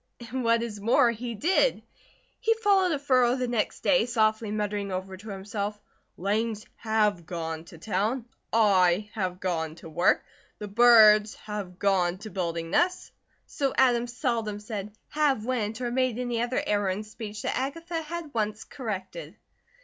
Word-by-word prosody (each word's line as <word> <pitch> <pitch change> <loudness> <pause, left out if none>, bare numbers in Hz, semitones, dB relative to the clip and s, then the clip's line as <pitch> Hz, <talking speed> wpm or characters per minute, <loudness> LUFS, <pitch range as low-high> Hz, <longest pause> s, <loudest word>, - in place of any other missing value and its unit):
And 260 0 -2
what 230 0 +3
is 215 -3 -5
more 235 +3 +4
he 235 +1 -5
did. 375 - +2 0.6
He 455 -2 +2
followed 400 -5 +3
a 305 - +1
furrow 255 -3 +3
the 255 -1 -1
next 235 -3 -1
day, 265 -4 +3
softly 220 -2 +1
muttering 205 -1 -2
over 190 +1 -4
to 210 +4 -11
himself: 205 +1 -4 0.4
"Langs 215 +3 -1
have 210 -6 0
gone 165 -2 -4
to 170 - -13
town. 215 +7 -1 0.3
I 200 -2 +3
have 185 -4 -3
gone 160 -4 -2
to 165 -1 -11
work. 175 +3 +3 0.3
The 210 - -6
birds 215 -1 +6
have 205 -4 -7
gone 185 -3 +2
to 215 +2 -9
building 170 -3 -3
nests." 360 - +1 0.3
So 275 -2 -2
Adam 245 -2 +4
seldom 235 -4 -2
said: 210 -1 -6 0.2
"have 285 -7 +1
went," 230 -2 -2
or 240 -1 -1
made 255 -2 +1
any 245 -2 -1
other 240 +1 -1
error 205 -2 +1
in 190 +3 -2
speech 215 -1 -8
that - - -1
Agatha 330 +5 -3
had 325 -1 -6
once 215 -1 -2
corrected. 190 - -6
215 Hz, 160 wpm, -27 LUFS, 195-245 Hz, 0.6 s, birds